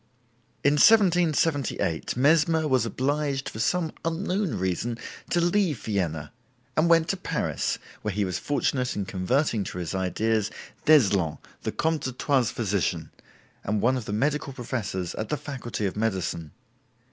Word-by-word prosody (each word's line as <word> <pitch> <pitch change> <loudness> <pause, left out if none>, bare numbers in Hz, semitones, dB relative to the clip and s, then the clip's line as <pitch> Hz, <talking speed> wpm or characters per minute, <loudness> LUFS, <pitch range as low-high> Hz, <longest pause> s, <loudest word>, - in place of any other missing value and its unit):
In 145 +1 +4
1778 160 - +3
Mesmer 160 +3 +4
was 130 -5 +2
obliged 140 +3 -1
for 110 - -6
some 165 +6 +1
unknown 180 +2 -1
reason 95 +6 -1 0.3
to 175 - +2
leave 175 - +1
Vienna, 85 -8 -2 0.4
and 160 +2 +3
went 165 -1 +5
to 195 - 0
Paris, - - -1 0.2
where 105 - -2
he 100 +1 0
was 90 - -2
fortunate 130 -3 0
in 100 - -2
converting 110 +5 0
to 90 - -6
his 85 -3 -4
ideas 105 +3 0 0.4
d'Eslon, 100 - +4 0.2
the - - -2
Comte 160 -2 -1
d'Artois's 130 -2 +1
physician, 95 -7 -1 0.5
and 105 +1 0
one 125 +5 +3
of 125 -4 -4
the 110 - -5
medical 140 +5 0
professors 105 -8 -3
at 110 - -4
the 150 - 0
Faculty 130 -6 -4
of 95 - -2
Medicine. 95 -7 -2
125 Hz, 145 wpm, -26 LUFS, 100-155 Hz, 0.5 s, went